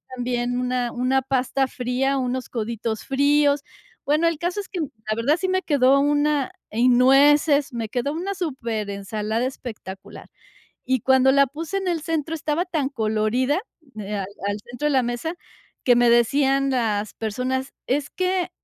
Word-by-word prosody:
también 245 0 -1
una 250 -1 -1
una 255 +2 +1
pasta 265 +1 0
fría, 255 +2 -1
unos 255 0 -3
coditos 225 -1 -3
fríos. 285 +1 +2 0.4
Bueno, 305 +4 +2
el 335 -2 0
caso 350 +5 -2
es 405 - -6
que, 370 - -5
la 225 -8 -4
verdad, 260 +8 +2
sí 375 - -1
me 375 0 0
quedó 275 -2 +4
una 290 +2 +1 0.2
y 235 +3 +2
nueces, 280 +3 +5
me 230 -2 -4
quedó 250 +4 -1
una 375 +5 -3
superensalada 220 - -3
espectacular. 215 -7 -9 0.6
Y 260 -1 +2
cuando 265 +2 +4
la 280 0 +5
puse 325 +8 -4
en 385 -1 -3
el 340 -2 0
centro, 320 0 -2
estaba 315 +2 -1
tan 315 -7 -1
colorida, 235 - 0 0.2
de 215 -9 -8
al - - -2 0.3
al 205 0 -1
centro 245 +5 -3
de - - +2
la 265 -3 +3
mesa, 240 +8 -3 0.5
que 245 -2 +5
me 240 0 +4
decían 270 +3 +3
las 215 -5 0
personas: 255 +4 -3 0.2
“Es 285 +3 0
que 365 -1 -1
265 Hz, 160 wpm, -23 LUFS, 240-295 Hz, 0.6 s, nueces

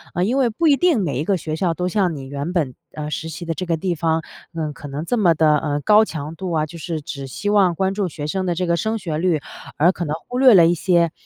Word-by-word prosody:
呃， 175 - +1
因 245 +6 0
为 255 -3 +3
不 285 +10 0
一 290 - +6
定 345 -7 +3
每 140 -7 -2
一 - - 0
个 195 +1 +1
学 155 -2 -4
校 170 -1 +1
都 180 +1 -2
像 185 -4 +1
你 135 -2 -7
原 140 +4 -4
本， 150 -8 0 0.2
呃， 150 -1 -5
实 160 - -4
习 160 +2 -7
的 165 - -2
这 175 +4 -4
个 170 - +1
地 180 +2 -1
方， 160 0 0 0.3
嗯， 155 -2 -2
可 145 - -10
能 145 +2 -5
这 245 - 0
么 180 -6 +4
地， 160 - +2
呃， 145 -1 -2
高 210 +6 +5
强 155 -3 -6
度 185 +1 -5
啊， 155 -1 +1
就 170 +2 -11
是 160 0 -4
只 140 -1 -7
希 205 +10 -4
望 190 -4 +4
关 190 +3 0
注 200 -1 -1
学 150 -3 -6
生 190 +4 -2
的 175 - 0
这 180 +2 -1
个 170 -1 +1
升 220 +7 -1
学 165 -7 -4
率， 170 -2 +1 0.4
而 170 +4 +5
可 175 -2 -4
能 150 0 -2
忽 245 - -4
略 260 -2 +7
了 170 -3 +7
一 170 - +3
些 170 -1 +2
170 Hz, 310 characters per minute, -21 LUFS, 155-190 Hz, 0.4 s, 略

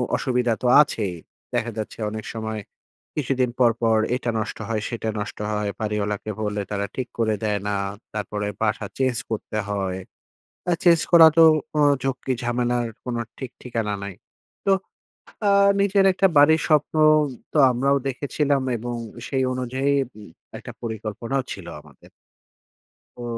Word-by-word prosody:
অসুবিধা 125 -3 +1
তো 125 - +2
আছেই। 105 -10 -1 0.4
দেখা 120 - 0
যাচ্ছে 110 - -5
অনেক 110 0 -6
সময়, 110 -1 -4 0.5
কিছুদিন 130 -3 0
পরপর 115 -2 +3 0.2
এটা 120 -2 -2
নষ্ট 110 - -4
হয়, 110 -2 -1
সেটা 110 -2 -3
নষ্ট 105 - -5
হয়। 105 -1 -1
বাড়িওয়ালাকে 105 -1 -2
বললে 105 -1 -1
তারা 100 0 -1
ঠিক 130 -1 -3
করে 110 -2 +2
দেয় 105 -1 0
না। 105 - 0 0.4
তারপরে 105 0 -3
বাসা 110 -1 0
চেঞ্জ 130 -2 +1 0.2
করতে 110 0 -3
হয়। 95 -2 -2 0.7
আ - - +3
চেঞ্জ 170 -2 +6
করা 165 -1 +10
তো 165 - +9 0.3
অ - - +4 0.2
ঝক্কি 135 0 -1
ঝামেলার 120 0 0 0.2
কোনো 120 -2 -2 0.2
ঠিক-ঠিকানা 120 -4 -4
নাই। 100 -1 -6 0.5
তো 195 - +5 0.8
আ - - +5 0.3
নিজের 200 0 +3
একটা 195 +1 +3
বাড়ির 160 +3 +6
স্বপ্ন 150 -1 +2 0.6
তো - - +1
আমরাও 135 +3 +2
দেখেছিলাম 140 +1 0 0.2
এবং 120 +1 -4 0.3
সেই 130 -1 0
অনুযায়ী 130 +2 -1 0.3
উম 105 - -11 0.3
একটা - - -9
পরিকল্পনাও 115 +3 -3
ছিল 95 -3 -9
আমাদের। 75 -3 -19 1.1
ও - - -5
120 Hz, 140 wpm, -23 LUFS, 105-130 Hz, 1.1 s, করা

